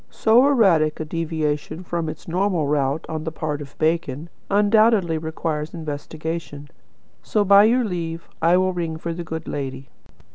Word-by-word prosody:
So 235 +5 +4
erratic 180 - +3
a 155 - -3
deviation 155 0 -3
from 170 -2 -3
its 155 - -9
normal 180 -2 0
route 145 +1 0
on 155 -1 -4
the 160 - -4
part 150 -2 -3
of 140 - -8
the - - -34
bacon, 160 -1 -1 0.2
undoubtedly 205 -4 +3
requires 160 0 -4
investigation. 155 -1 -6 0.5
So, 210 -2 0
by 200 +1 +7
your 245 +3 +3
leave, 170 -5 -4
I 170 +2 +4
will 185 0 +1
ring 165 -3 -3
for 170 +1 -4
the 175 +1 -5
good 160 -1 -6
lady." 135 -1 -5
165 Hz, 160 wpm, -22 LUFS, 155-185 Hz, 0.5 s, by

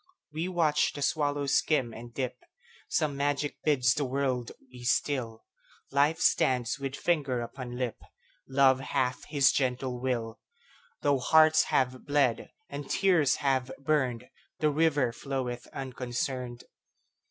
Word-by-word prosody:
We 160 +3 -2
watch 165 -5 +2
the 145 - -4
swallow 145 -1 0
skim 135 -3 +1
and 120 +1 -10
dip; 130 0 -3 0.5
Some 150 -3 0
magic 145 +1 -1
bids 130 -6 +3
the 145 - -1
world 130 -2 -1 0.2
be 125 -1 -11
still; 120 -3 -1 0.5
Life 145 +4 +2
stands 125 +1 +2
with 135 -1 -4
finger 140 -8 0
upon 120 +1 -7
lip; 125 -3 -2 0.5
Love 135 -1 +4
hath 130 -1 -1
his 140 -4 +3
gentle 125 -1 -1
will; 120 -3 -2 0.6
Though 145 -2 +2
hearts 155 +4 +5
have 130 +1 0
bled, 140 -5 +1 0.2
and 145 -1 -7
tears 180 -8 +3
have 130 -1 +1
burned, 130 -4 0 0.3
The 150 -1 +2
river 145 -5 +2
floweth 125 -1 -4
unconcerned. 125 -1 -4
135 Hz, 130 wpm, -29 LUFS, 125-145 Hz, 0.6 s, hearts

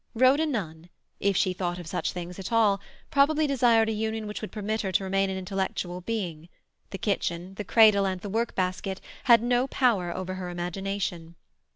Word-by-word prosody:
Rhoda 265 +6 +4
Nunn, 170 - -4 0.3
if 200 -2 +1
she 185 -1 +2
thought 175 -1 -2
of 175 - -8
such 160 - -2
things 180 +1 -7
at 190 - -6
all, 210 -4 +3 0.3
probably 300 +2 +3
desired 240 -5 +4
a - - 0
union 220 0 -2
which 210 0 -5
would 215 - -6
permit 215 +1 -2
her 190 - -2
to 195 - +1
remain 195 0 +1
an 190 - -3
intellectual 185 -1 -3
being; 175 -6 -4 0.4
the 195 - -5
kitchen, 185 -3 -2
the 210 - -5
cradle, 210 -3 +5
and 185 -1 -2
the 205 - -6
work 225 +4 -1
basket 185 +1 -2 0.3
had 235 -3 +6
no 245 +2 +2
power 230 -10 +1
over 185 +1 -4
her 185 -1 -5
imagination. 175 -1 -4
195 Hz, 190 wpm, -27 LUFS, 180-225 Hz, 0.4 s, had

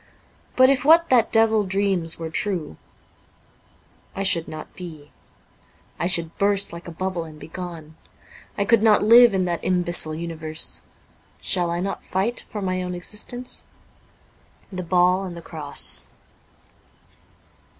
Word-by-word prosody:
But 260 +1 +6
if 270 - 0
what 330 +3 +5
that 245 -5 +3
devil 220 -1 +3
dreams 190 -4 0
were 165 -1 -6
true, 175 - -2 1.4
I 195 - -3
should 170 -4 +3
not 155 0 -9
be 155 -5 -10 0.4
— - - -34
I 170 - 0
should 170 -3 -1
burst 200 -1 +3
like 170 +1 -10
a - - -7
bubble 185 0 -4
and 155 -2 -12
be - - -10
gone; 165 -3 -8 0.6
I 200 - 0
could 230 +1 +3
not 215 -2 +4
live 230 0 +7
in 185 -1 0
that 175 -1 -3
imbecile 175 -3 +2
universe. 160 -1 -2 0.6
Shall 175 -3 0
I 170 +1 -2
not 195 +1 -4
fight 200 +6 -2
for 210 -2 -6
my 185 -1 -2
own 180 0 -4
existence? 210 +7 -4 0.4
' - - -34
' - - -33
The 185 - -4
Ball 180 +1 +2
and 180 -2 -7
the - - -6
Cross.'' 155 -3 +1
185 Hz, 150 wpm, -22 LUFS, 170-205 Hz, 1.4 s, live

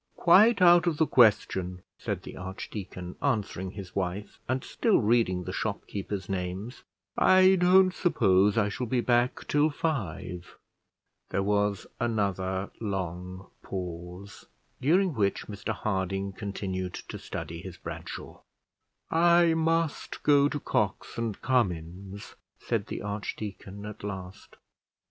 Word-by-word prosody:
"Quite 200 +4 +6
out 175 0 +7
of 160 -3 +1
the 160 - +4
question," 95 -8 +3 0.2
said - - -3
the - - -9
archdeacon, 95 -1 -7
answering 105 -8 -1
his 100 -3 -9
wife, 100 +4 -3
and 130 +1 0
still 225 -4 +2
reading 105 -5 +2
the - - -5
shopkeepers' 100 -2 -4
names; 95 +5 -4 0.4
"I 185 0 +6
don't 185 0 +5
suppose 100 - +3
I 105 -2 +3
shall 120 +4 -3
be 125 +1 +1
back 120 +1 +1
till 150 +1 +3
five." 95 - -4 0.7
There 100 - 0
was 100 -1 +1
another 100 -4 -1
long 95 -2 -4
pause, 90 +1 -7 0.3
during 180 +6 +3
which 100 -5 0
Mr 100 -1 -5
Harding 95 -1 -2
continued 95 -2 -4
to - - -6
study 85 +1 -6
his 90 -1 -9
Bradshaw. - - -8 0.7
"I 170 0 +5
must 165 -1 -1
go 145 -1 +5
to 145 - -3
Cox - - -1
and 115 -4 -2
Cummins," 95 -4 -1 0.2
said - - -2
the - - -5
archdeacon 100 -1 -5
at 105 -1 -8
last. 95 -2 -7
100 Hz, 125 wpm, -28 LUFS, 95-135 Hz, 0.7 s, out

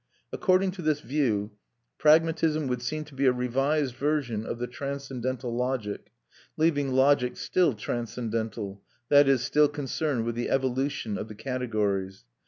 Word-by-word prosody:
According 185 0 +2
to 185 -1 -8
this 155 -2 +1
view, 115 -7 0 0.5
pragmatism 155 0 +3
would 125 -2 -2
seem 155 +5 -3
to 150 - -16
be 135 0 +1
a - - +7
revised 135 +3 0
version 130 -5 -1
of - - -3
the 120 - -2
transcendental 130 -2 -4
logic, 125 -4 -2 0.5
leaving 145 -4 +2
logic 130 -1 +3
still 175 -9 +2
transcendental, 110 -3 -4 0.3
that 145 -1 +7
is, 135 -3 +3
still 150 0 +4
concerned 145 -3 -2
with 120 - -1
the 120 +1 -3
evolution 130 -4 -1
of - - -5
the 110 - -9
categories. 105 -6 -2
130 Hz, 145 wpm, -27 LUFS, 115-145 Hz, 0.5 s, a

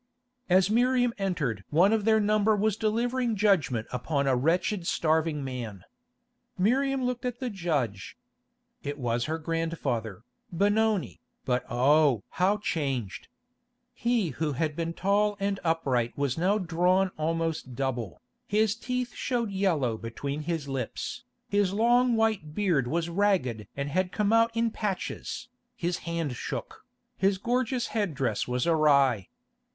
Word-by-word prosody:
As 185 +2 +4
Miriam 245 +1 +3
entered 165 - -1
one 180 +8 +4
of 215 -2 +1
their 220 -1 +5
number 215 +1 +3
was 210 0 +1
delivering 235 +2 0
judgment 180 - +2
upon 140 +3 -1
a 135 -1 +3
wretched 170 - 0
starving 160 -2 +1
man. 120 -8 -6 0.7
Miriam 265 +7 +2
looked 250 -1 -2
at 245 -1 -3
the 255 -3 -3
judge. 145 - -2 0.6
It 145 +1 -4
was 120 -2 -1
her 160 +1 -2
grandfather, 160 - -3 0.3
Benoni, 205 +2 +1 0.2
but 125 -1 0
oh! 135 -1 +3 0.2
how 195 +3 +4
changed. 135 - -3 0.7
He 235 -6 0
who 150 +2 -2
had 150 +2 -1
been 165 0 -3
tall 205 +2 +1
and 200 0 -1
upright 135 -8 0
was 140 -3 0
now 185 +5 +2
drawn 180 +1 +2
almost 160 -4 -2
double, 120 -8 -3 0.2
his 210 0 +2
teeth 250 +1 -3
showed 235 -5 -2
yellow 160 - 0
between 140 +6 -4
his 160 -2 -3
lips, 135 -4 -4 0.2
his 200 -2 +1
long 240 +3 +3
white 215 -9 0
beard 170 - +1
was 165 +5 -1
ragged 170 - 0
and 140 0 -2
had 185 +4 0
come 210 +2 +1
out 230 0 +5
in 230 0 +1
patches, 210 +2 -4 0.3
his 175 -5 -2
hand 165 -6 -2
shook, - - -6 0.3
his 195 +1 +3
gorgeous 245 +3 0
head 205 - -1
dress 125 -7 -1
was 125 0 -1
awry. 140 - +3
170 Hz, 140 wpm, -28 LUFS, 140-210 Hz, 0.7 s, their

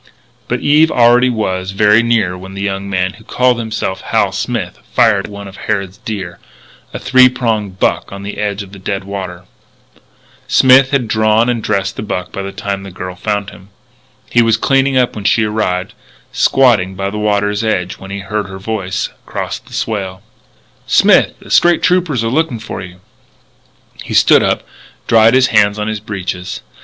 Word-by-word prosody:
But - - -2
Eve 155 +2 +4
already 120 0 +4
was 95 -5 -2
very 105 +2 +4
near 115 -6 +1
when 95 +1 -10
the 100 - -5
young 100 0 -3
man 95 -1 -1
who 110 - -16
called 125 +1 +1
himself 110 -4 -3
Hal - - 0
Smith - - -3
fired 105 -4 +3
at - - -10
one 100 0 -8
of 95 - -12
Harrod's 100 -1 -3
deer 95 -6 -6 0.5
a - - -5
three 130 0 +5
prong 115 -5 -1
buck 95 0 -1
on 100 0 -8
the 100 - -6
edge 100 -1 -2
of 95 - -14
the 100 - -11
dead 95 +1 -3
water. 95 -2 -6 1.0
Smith 130 0 +5
had 135 -4 0
drawn 110 +2 +2
and 120 -2 -1
dressed 100 -2 -1
the - - -3
buck 90 -4 -4
by 100 - -5
the 100 0 -5
time 100 0 -4
the 100 - -9
girl 90 0 -7
found 100 +1 -3
him. 95 +2 -16 0.6
He 120 - +3
was 115 -1 +3
cleaning 135 +2 +2
up 125 -1 +2
when 105 -2 -7
she 110 +1 +3
arrived, 105 -4 -2 0.4
squatting 110 -8 +3
by 100 +1 -3
the 105 - -4
water's 105 0 0
edge 90 -5 -2
when 95 - -10
he 100 0 -5
heard 105 +1 -3
her 95 0 -8
voice 100 -1 -3 0.2
across - - -4
the - - -21
swale: 95 -4 -4 0.6
"Smith! - - +4
The - - -13
State 175 0 +4
Troopers 175 -9 +1
are - - 0
looking 150 -1 0
for 110 -3 -7
you!" 90 0 -11 1.0
He - - -5
stood - - +6
up, - - 0 0.4
dried 115 +1 +5
his 130 0 +4
hands 105 -1 +4
on 105 0 -3
his 110 -1 -3
breeches. 95 -3 -5
105 Hz, 185 wpm, -15 LUFS, 95-115 Hz, 1.0 s, stood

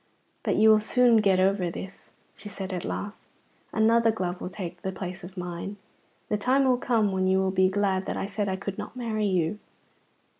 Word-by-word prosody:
"But - - 0
you 220 +1 +5
will 215 0 +7
soon 235 +2 +4
get 195 -3 +3
over 190 -1 +2
this," 190 +3 -9 0.2
she 205 - -10
said 190 -1 -5
at 180 - -3
last; 205 +1 -5 0.4
"another 225 +1 +4
glove 180 -4 -3
will - - -4
take 180 -2 -7
the 190 - -3
place 185 -1 -6
of 185 +2 -10
mine; 180 +3 -5 0.5
the 210 - 0
time 260 +6 +2
will 250 -1 +3
come 220 -5 +1
when 185 0 0
you 190 0 +3
will 190 0 +1
be 185 0 +3
glad 190 -1 0
that - - -2
I - - -2
said 200 0 -2
I 190 - -1
could 195 0 -6
not - - -7
marry 220 -4 -1
you." 185 +1 0
195 Hz, 210 wpm, -27 LUFS, 185-215 Hz, 0.5 s, will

